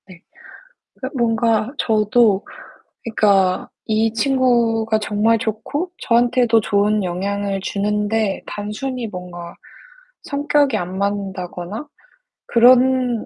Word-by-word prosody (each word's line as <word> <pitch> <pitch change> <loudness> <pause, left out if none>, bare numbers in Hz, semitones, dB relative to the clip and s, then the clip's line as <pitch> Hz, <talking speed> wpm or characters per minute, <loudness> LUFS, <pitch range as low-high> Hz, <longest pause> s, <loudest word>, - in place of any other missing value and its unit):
네. 180 -3 -15 0.7
그니까 260 - -6
뭔가 225 -1 +1
저도 215 -2 +2 0.6
그니까 200 -5 +2 0.2
이 220 +1 +1
친구가 230 -3 +1
정말 215 +2 +1
좋고 255 - -3
저한테도 240 -1 +3
좋은 205 0 +1
영향을 195 +2 -2
주는데 210 +1 -1
단순히 230 +4 -5
뭔가 180 -3 -9 0.7
성격이 290 -2 +1
안 180 0 -5
맞는다거나 200 +3 -4 0.6
그런 250 0 +4
220 Hz, 215 characters per minute, -19 LUFS, 200-240 Hz, 0.7 s, 그런